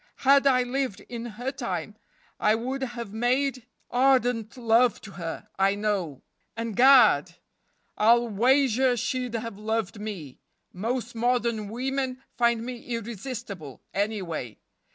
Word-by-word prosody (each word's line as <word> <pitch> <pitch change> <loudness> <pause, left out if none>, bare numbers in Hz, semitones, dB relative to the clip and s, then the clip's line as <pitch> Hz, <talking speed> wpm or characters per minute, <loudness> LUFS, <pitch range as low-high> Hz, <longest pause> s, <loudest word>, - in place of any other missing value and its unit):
Had 275 +1 +6
I 255 -2 +4
lived 255 -3 -2
in 235 -1 -5
her 250 +2 -2
time 215 - -4 0.4
I 215 - +3
would 260 +4 -3
have 240 -5 -5
made 255 +2 0 0.2
ardent 245 -3 +2
love 235 0 +3
to 215 - -10
her, 170 +2 -6
I 195 +1 +3
know; 200 -9 -2 0.3
and, 230 -2 -3
gad! 225 - +6 0.6
I'll 235 +2 +5
wager 250 +3 +3
she'd 250 0 -2
have 230 -3 -5
loved 220 -1 -2
me. 190 -11 -7 0.3
Most 235 +5 -3
modern 235 -2 0
women 260 +2 -2 0.2
find 235 -1 +2
me 245 -1 -6
irresistible, 225 - -6
anyway. 190 - -3
235 Hz, 125 wpm, -26 LUFS, 210-250 Hz, 0.6 s, Had